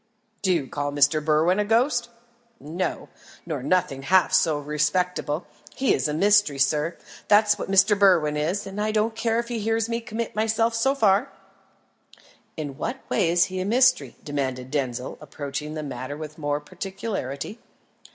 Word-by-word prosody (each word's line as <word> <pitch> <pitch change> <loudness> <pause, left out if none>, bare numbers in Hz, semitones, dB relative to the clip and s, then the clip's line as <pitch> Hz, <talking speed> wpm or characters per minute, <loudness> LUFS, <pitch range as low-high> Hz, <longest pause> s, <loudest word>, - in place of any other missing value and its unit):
"Do 190 - +2
you 165 -6 +1
call 145 +2 -3
Mr. 145 +1 +3
Berwin 160 +5 +2
a - - +3
ghost?" 235 +3 +1 0.5
"No; 170 +5 -4 0.4
nor 155 -5 -4
nothing 140 -3 0
half 185 +6 +3
so 170 -5 +3
respectable. 150 +2 -1 0.3
He 265 - +2
is 130 - 0
a 150 - -2
mystery, 205 -4 +3
sir, 150 +4 +1 0.3
that's 210 0 +4
what - - -5
Mr. 195 +2 +5
Berwin 180 -7 +4
is, 165 +7 -1
and 195 +2 -5
I 215 +1 0
don't 220 +1 +1
care 225 0 0
if 235 0 -2
he 235 -2 -2
hears 225 +1 0
me 235 0 -2
commit 230 -1 -5
myself 225 +1 +1
so 265 +5 +1
far." 220 +1 +2 1.3
"In 145 -4 -6
what 255 +4 -5
way 185 -6 +2
is 175 +1 +4
he 185 0 -5
a 185 - -2
mystery?" 255 +5 +3
demanded 130 -3 -3
Denzil, 130 -3 -3
approaching 150 +1 -6
the 155 - -4
matter 135 +1 -6
with 155 0 -8
more 145 -1 -1
particularity. 190 - -5
180 Hz, 165 wpm, -24 LUFS, 150-215 Hz, 1.3 s, Mr